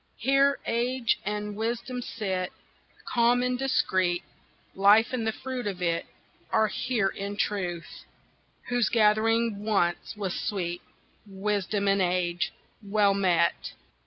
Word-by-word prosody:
Here 275 +1 +3
age 240 0 0
and 210 0 -3
wisdom 235 +3 -3
sit 190 -6 -3 0.5
Calm 240 +1 +3
and 250 0 0
discreet, 185 -9 +1 0.5
Life 205 +5 +5
and 230 -3 -1
the - - +2
fruit 255 0 -5
of 190 -3 -4
it 170 -2 -1 0.4
Are 220 -1 +3
here 230 -4 0
in 200 +1 -5
truth, 180 -5 -3 0.6
Whose 245 -2 +2
gathering 220 -1 +2
once 195 -3 0
was 195 -4 -2
sweet 175 -4 -3 0.5
Wisdom 200 0 -1
and 195 0 +3
age! 180 0 0 0.3
Well 205 -1 +2
met! 180 -4 +1
210 Hz, 120 wpm, -27 LUFS, 190-235 Hz, 0.6 s, Life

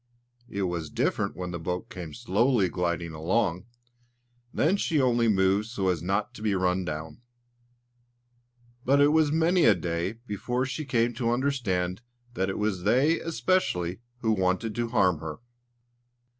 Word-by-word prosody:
It 100 0 -2
was 85 -4 -2
different - - -1
when 90 -1 -5
the 85 - -4
boat 90 +7 -4
came 85 -7 -7
slowly 120 -2 +2
gliding 85 -1 -2
along; 90 +3 0 0.9
then 165 +6 +2
she 165 -6 0
only 120 -3 +3
moved 100 0 +2
so 100 -5 -1
as 90 -4 0
not 100 +4 -1
to - - -11
be 105 -2 +1
run 90 0 +1
down. 80 +4 -6 1.6
But 140 +2 +3
it 145 0 +6
was 155 -1 +3
many 165 +3 +3
a 105 - +6
day 85 +2 -2
before 125 +4 -2
she 145 +3 -4
came 120 -2 +1
to 120 -1 -1
understand 115 -8 -1 0.3
that 95 -4 -1
it 95 - -3
was 105 -4 -1
they 130 - +3
especially 135 - 0 0.2
who 110 - +1
wanted 95 +2 0
to 120 +2 -1
harm 90 -8 +2
her. 80 -1 -6
100 Hz, 155 wpm, -27 LUFS, 90-120 Hz, 1.6 s, it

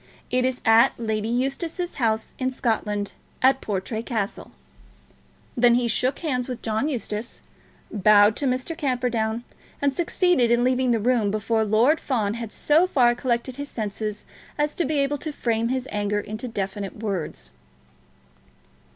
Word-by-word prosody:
It 250 0 +2
is 255 -1 -1
at 225 0 +6
Lady 220 -2 -2
Eustace's 275 +9 -2
house 220 -1 0
in 260 -1 +1
Scotland; 210 -5 -1 0.3
at 265 +1 +4
Portray 210 +2 -3
Castle." 220 -4 -4 1.0
Then 240 -1 +5
he 245 -1 +1
shook 255 +3 0
hands 255 -7 -2
with 250 - -6
John 220 +6 0
Eustace, 230 -4 -4 0.5
bowed 210 +1 +5
to 280 - 0
Mr. 255 +6 -1
Camperdown, 245 -6 -1 0.4
and 280 -1 +1
succeeded 345 -5 +2
in 240 +1 +3
leaving 255 0 +2
the 235 -2 +2
room 230 -2 +2
before 220 +2 0
Lord 230 +9 +3
Fawn 215 -7 -1
had 230 -2 -6
so 320 +5 +3
far 245 -8 +4
collected 245 +1 -2
his 285 0 -5
senses 210 -1 -4 0.3
as 295 0 0
to 345 - -1
be 300 +2 0
able 280 +1 +1
to 310 - -4
frame 230 -5 0
his 260 +1 -2
anger 205 0 0
into 215 +4 -6
definite 200 -2 -4
words. 190 - -4
235 Hz, 150 wpm, -24 LUFS, 215-260 Hz, 1.0 s, at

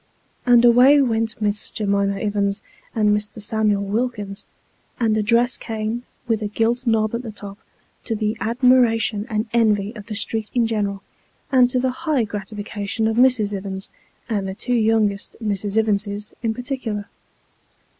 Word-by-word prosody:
And 240 -1 +6
away 250 +5 +7
went 225 -3 0
Miss 205 -1 -1
J'mima 200 -2 0
Ivins 200 -1 -1 0.3
and 210 -2 +3
Mr. 210 +1 -5
Samuel 210 -1 0
Wilkins, 205 -1 -3 0.5
and 225 -3 +2
a 215 - +2
dress 235 +3 +2
cane, 220 +1 -3 0.3
with 225 -2 0
a 210 - -1
gilt 230 +4 0
knob 220 -1 +2
at 235 - -2
the 240 - -7
top, 205 -1 -9 0.5
to 225 - -1
the 215 0 -1
admiration 230 -2 +2
and 215 -1 -1
envy 215 -3 +2
of 210 -2 -10
the 215 - -5
street 220 0 -1
in 240 -2 +3
general, 205 -3 -2 0.5
and 250 -2 +5
to 250 - 0
the 260 0 +1 0.2
high 280 -6 +3
gratification 205 +1 -3
of 220 - 0
Mrs. 245 -5 +4
Ivins, 195 0 -6 0.4
and 205 -4 -1
the 190 - -5
two 245 +4 -2
youngest 215 -3 +1
Miss 210 -4 -2
Ivinses 205 -1 -1
in 225 -2 -1
particular. 245 -5 -4
220 Hz, 155 wpm, -21 LUFS, 205-235 Hz, 0.5 s, away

